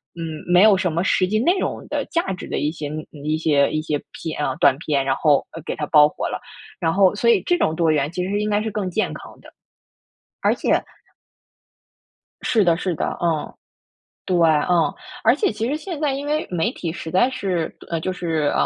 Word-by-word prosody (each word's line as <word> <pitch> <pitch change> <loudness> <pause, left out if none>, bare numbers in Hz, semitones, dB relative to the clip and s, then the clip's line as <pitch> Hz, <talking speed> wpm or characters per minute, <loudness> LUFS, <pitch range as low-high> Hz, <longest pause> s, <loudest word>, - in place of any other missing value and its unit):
嗯 160 -2 -6
没 180 +1 +6
有 215 -2 +7
什 185 -3 0
么 170 +3 0
实 185 0 +2
际 215 +3 0
内 345 - +2
容 - - -3
的、 - - -2
价 335 - 0
值 180 - -8
的 - - -3
一 150 - 0
些 150 -3 -6
嗯， 155 +1 -5 0.2
一 155 +1 0
些 145 -3 +2
一 155 0 -1
些 150 -2 -2
片 155 -2 -5
哦 130 - -2
短 140 -4 +5
片， 140 -3 0
然 135 - +1
后 145 -2 +3 0.2
给 - - -3
他 150 - -3
爆 150 -2 +7
火 - - -4
了。 - - -4 0.4
然 165 -2 +1
后， 195 -1 +4
所 235 +3 +2
以 - - +4
这 350 - +2
种 160 - +1
多 165 -1 +2
元 145 0 0
其 180 0 -3
实 185 - -3
是 205 +1 0
应 210 - -1
该 205 0 +1
是 220 - -2
更 200 -3 -2
健 220 - -1
康 - - -11
的。 - - -15 0.9
而 - - +3
且 - - +1 1.6
是 220 -3 +2
的， 170 -3 +4
是 180 +1 -2
的， - - -1 0.2
嗯， 165 -3 -1 0.7
对， 185 - 0
嗯。 165 +1 +3 0.3
而 - - +5
且 410 -4 +1
其 225 - -3
实 285 - -1
现 330 -1 -6
在 295 -3 +1
因 275 +1 -4
为 300 +2 -1
媒 180 +5 0
体 170 - -4
实 160 -1 -7
在 190 +8 +3
是， 185 -9 -2
呃 165 -1 -1
就 185 - -2
是 165 -5 -1
175 Hz, 240 characters per minute, -22 LUFS, 155-210 Hz, 1.6 s, 有